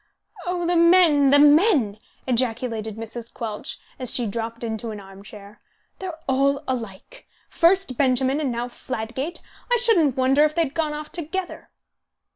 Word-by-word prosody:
"Oh, 355 -1 -1
the 350 +1 +1
men, 335 -5 +5
the 285 - +6
men!" 290 - +4 0.3
ejaculated 230 -3 -1
Mrs. 225 +1 -7
Quelch, 215 -3 -5 0.2
as 255 -2 0
she 245 - +1
dropped 230 +2 -5
into 225 0 -4
an 210 -1 -6
arm 195 0 -13
chair. 205 0 -13 0.4
"They're 365 -4 -6
all 275 +2 +1
alike. 240 - -6 0.2
First 340 -6 +2
Benjamin, 265 +1 +2
and 275 -4 -1
now 240 +1 -3
Fladgate! 255 +5 -5 0.3
I 485 - +5
shouldn't 345 - +3
wonder 265 +3 +4
if 305 0 +1
they 335 - +3
had 285 -3 -5
gone 310 -2 -1
off 300 0 -7
together." 355 +3 -4
265 Hz, 155 wpm, -23 LUFS, 230-320 Hz, 0.4 s, the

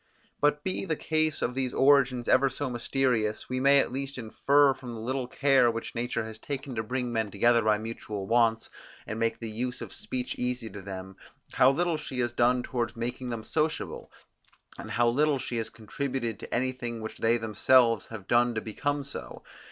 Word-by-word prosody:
But 150 0 +2
be 185 - -2
the 165 -5 -1
case 155 0 0
of 125 - 0
these 130 -1 -2
origins 135 -3 +4
ever 135 +1 +4
so 140 -1 -4
mysterious, 120 -3 0
we 130 0 -1
may 140 +2 +5
at 140 - +2
least 135 +1 -4
infer 140 +4 +3
from 125 -2 -8
the - - -7
little 130 +2 -2
care 135 -2 +4
which 115 0 -4
nature 120 -1 -2
has 110 -1 -9
taken 140 0 -5
to 110 - -1
bring 125 +2 -3
men 110 -2 0
together 115 +4 +3
by 110 -1 +3
mutual 110 -2 -5
wants, 115 0 +2 0.3
and 110 - -5
make 115 0 0
the 115 - -6
use 125 +3 -3
of - - -8
speech 125 -1 -4
easy 125 -3 -2
to 100 - -8
them, 95 0 -8 0.4
how 130 - +6
little 170 +4 +1
she 140 -4 -6
has 120 -1 -1
done 125 +1 +3
towards 120 -2 -2
making 120 +2 -4
them 115 -2 -4
sociable, 155 +3 -2 0.6
and - - -8
how 120 0 +2
little 145 +4 +3
she 125 -2 -4
has 110 -1 -2
contributed 115 0 -4
to - - -9
anything 120 -2 -2
which 110 - -7
they 115 +1 +3
themselves 115 +1 +3
have 110 -4 -9
done 120 0 +3
to - - +1
become 145 +6 -2
so. 140 - -8
120 Hz, 195 wpm, -28 LUFS, 115-135 Hz, 0.6 s, how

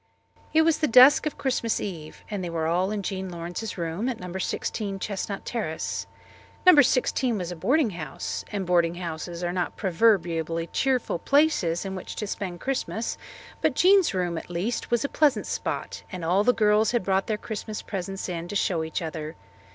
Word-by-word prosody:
It 320 0 +5
was 325 -1 +2
the 305 - +2
dusk 255 +6 +7
of 305 - -4
Christmas 240 -4 0
Eve 160 -6 -7
and 200 -3 -3
they 175 - -3
were 165 -1 -2
all 175 +4 +1
in 210 -1 -3
Jean 190 0 -3
Lawrence's 175 +6 -5
room 170 +8 -2
at 245 - -4
No. 180 0 -7
16 195 +2 -2
Chestnut 200 0 -4
Terrace. 205 -10 -3 0.6
No. 360 -5 +9
16 255 -2 +1
was 180 -2 -4
a - - -5
boarding 260 - +2
house, 155 -6 -5
and 200 -2 -2
boarding 170 -1 +2
houses 170 0 -5
are 175 0 -1
not 180 -1 -2
proverbially 165 -4 +1
cheerful 255 -9 +1
places 275 - +2
in 190 - -4
which 185 - -6
to 210 - -3
spend 185 -3 -4
Christmas, 255 -4 -2 0.5
but - - +2
Jean's 380 - +5
room, 175 -2 -1
at - - -13
least, 180 +7 -2
was 240 +2 +1
a - - +2
pleasant 295 -1 +2
spot, - - -3
and 180 -4 -5
all 185 +5 +3
the 250 - +5
girls 215 0 +3
had 240 - +1
brought 190 0 +1
their 215 - 0
Christmas 215 0 -6
presents 195 -1 -4
in 170 -2 -4
to 205 - -6
show 175 -5 +1
each 160 +2 -3
other. 155 -1 -5
195 Hz, 190 wpm, -26 LUFS, 175-230 Hz, 0.6 s, No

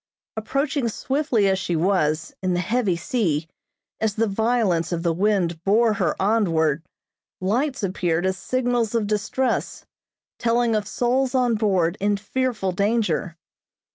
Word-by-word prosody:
Approaching 275 +3 -1
swiftly 260 -3 0
as 190 -1 +2
she 175 -2 -2
was, 160 -3 +1
in 185 -1 0
the - - 0
heavy 210 0 0
sea, 170 - -1 0.5
as 220 -2 0
the 225 - +2
violence 210 -5 +1
of 170 -1 -2
the 170 -2 +1
wind 175 -3 0
bore 220 +3 +3
her 185 -6 -1
onward, 170 -8 +2 0.6
lights 250 +7 -1
appeared 175 -2 0
as 190 0 +1
signals 240 +1 -1
of 225 -2 +1
distress, 215 +5 -1 0.5
telling 235 -1 +2
of 210 -1 -1
souls 250 +4 0
on 250 -2 +3
board 195 -5 +1
in 205 +1 +1
fearful 220 -2 -1
danger. 200 -3 0
205 Hz, 140 wpm, -23 LUFS, 180-235 Hz, 0.6 s, bore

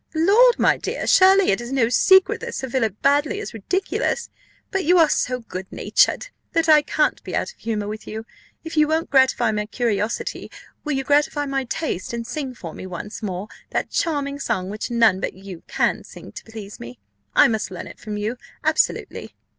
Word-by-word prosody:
"Lord, 425 +10 +5
my - - +3
dear, - - -4
surely 385 0 +6
it 195 - 0
is 240 +1 -7
no 260 -4 +2
secret 380 +10 +4
that - - -5
Sir 265 - -3
Philip 225 -5 -1
Baddely 290 +8 +2
is 420 - -6
ridiculous; 370 - -2 0.4
but 385 -1 0
you 355 +4 +4
are 325 -2 +6
so 250 -3 0
good 190 -4 -8
natured - - +1 0.2
that 330 -1 +2
I 305 -1 +7
can't - - 0
be - - -5
out - - -1
of - - -37
humour 215 -2 -3
with 215 +1 -7
you. 220 +1 -6 0.4
If 325 0 -7
you 305 -1 +5
won't 320 +2 -1
gratify 260 -4 +4
my 210 -1 -2
curiosity, 220 -2 -2 0.3
will 300 - -2
you 270 0 -1
gratify 290 +1 +2
my 270 -1 -2
taste, 235 - -3
and 235 -1 -4
sing 270 -1 -5
for 165 -8 -8
me 185 - -8
once 185 +5 -7
more 195 -1 -4 0.2
that - - -2
charming 285 -3 -1
song 185 -8 -2
which 210 - -4
none 230 -5 +3
but - - -3
you 190 -3 -10
can - - 0
sing - - -12
to - - -9
please 215 -2 -9
me? 120 +1 -9 0.4
I - - +7
must 220 -2 -1
learn 180 - -7
it - - -12
from 210 -1 -5
you, 215 +4 -3 0.3
absolutely." - - 0
245 Hz, 200 wpm, -22 LUFS, 210-305 Hz, 0.4 s, I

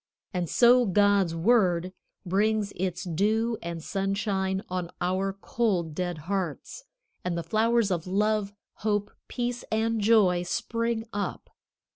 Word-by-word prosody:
And 175 -3 -2
so 245 0 +5
God's 200 -3 +3
Word 185 -2 +2 0.3
brings 205 +2 +1
its 180 0 -2
dew 215 +6 0
and 170 -1 -5
sunshine 195 0 -1
on 180 -2 -3
our 185 +2 0
cold, 195 -4 -1
dead 175 -1 -3
hearts, 190 - -4 0.4
and 175 -1 -2
the 170 - -2
flowers 225 0 +2
of 170 -1 -2
love, 210 +1 +1 0.3
hope, 205 -1 -1 0.2
peace 245 0 -3
and 220 0 +1
joy 200 -5 +4
spring 230 +5 -2
up. 205 0 -4
195 Hz, 125 wpm, -27 LUFS, 180-220 Hz, 0.4 s, so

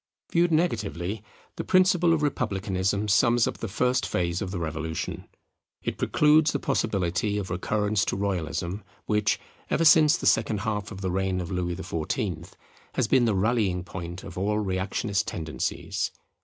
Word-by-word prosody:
Viewed 170 0 +3
negatively, 105 - -1 0.4
the - - -2
principle 185 -2 +4
of 160 -2 +2
Republicanism 100 -6 -1
sums 120 +3 +4
up - - -4
the 115 - -3
first 125 +5 +1
phase 85 0 -1
of 95 - -3
the 95 - -4
Revolution. 80 -1 -4 0.6
It - - -3
precludes 150 +1 +4
the - - +1
possibility 100 -1 0
of 95 -3 -4
recurrence 105 +3 0
to - - -1
Royalism, 95 0 -2 0.2
which, 105 -1 +1 0.3
ever 165 - +2
since 155 -1 +7
the - - -6
second 110 -2 +2
half 105 -1 -2
of 95 -2 -8
the 95 -2 -1
reign 95 0 0
of 85 -2 -5
Louis 90 -1 -1
XIV, 85 0 -3 0.5
has - - +1
been 130 -2 +4
the 110 -3 +2
rallying 100 -3 +1
point 85 0 -7
of 90 -2 -7
all 105 +2 +1
reactionist 100 +1 -1
tendencies. 80 -2 -3
100 Hz, 155 wpm, -26 LUFS, 90-115 Hz, 0.6 s, since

